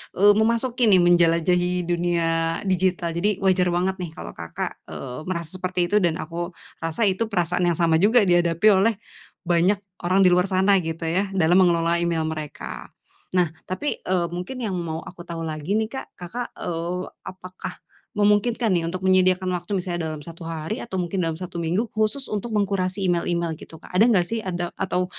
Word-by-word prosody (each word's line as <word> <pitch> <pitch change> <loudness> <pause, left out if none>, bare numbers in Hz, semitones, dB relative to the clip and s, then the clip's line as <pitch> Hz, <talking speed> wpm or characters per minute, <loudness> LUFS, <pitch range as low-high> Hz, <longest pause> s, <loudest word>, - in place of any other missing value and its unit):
eee, 205 +2 +6
memasuki 235 +2 +2
nih 185 -4 +6
menjelajahi 175 +1 +3
dunia 175 -1 0 0.4
digital. 185 -3 +1
Jadi 195 +4 -1
wajar 185 -1 +3
banget 185 +2 +1
nih 180 -2 -4
kalau - - -7
Kakak, 85 -1 -6
eee, 135 +4 -7
merasa 170 -3 -3
seperti 180 -1 -1
itu, 210 - +5
dan 170 -5 +1
aku 170 +1 -5 0.2
rasa 165 +7 -2
itu 205 +2 +1
perasaan 180 -3 0
yang 170 - +2
sama 165 -1 +3
juga 220 +5 +5
dihadapi 175 0 +3
oleh 205 +3 +3 0.5
banyak 180 +3 +2 0.2
orang 185 +3 +3
di 180 - +6
luar 180 +1 +3
sana, 190 +1 +3
gitu 165 -1 -4
ya, 180 +5 0
dalam 175 0 +4
mengelola 170 -2 +3
email 170 -2 0
mereka. 155 -2 -6 0.5
Nah, 175 -3 +3 0.2
tapi, 240 +11 -3
eee, 180 -2 0
mungkin 180 +9 -5
yang 190 -5 -2
mau 165 -1 -4
aku 175 -1 -11
tahu 165 -1 -5
lagi 155 +4 -2
nih, 220 0 0
Kak. 265 - -5
Kakak, 230 +8 -5
eee, 175 +1 -3 0.2
apakah 185 0 -8 0.4
memungkinkan 210 +2 +2
nih 175 - +2
untuk 185 +2 -4
menyediakan 185 0 +3
waktu, 180 +3 -2
misalnya 175 -3 -3
dalam 155 -2 -7
1 170 0 -11
hari 165 +7 -4
atau 190 -5 -5
mungkin 180 +1 -1
dalam 165 -2 -1
1 175 -1 -5
minggu, 175 +8 0
khusus 220 +6 0
untuk 210 +3 -3
mengkurasi 195 -1 0
email-email, 170 -1 0
gitu, 160 - -11
Kak? - - -15
Ada 195 +5 +5
enggak 190 -7 +4
sih 225 +4 -2
ada 175 -3 -3
atau 185 -1 -1
180 Hz, 180 wpm, -23 LUFS, 170-195 Hz, 0.5 s, eee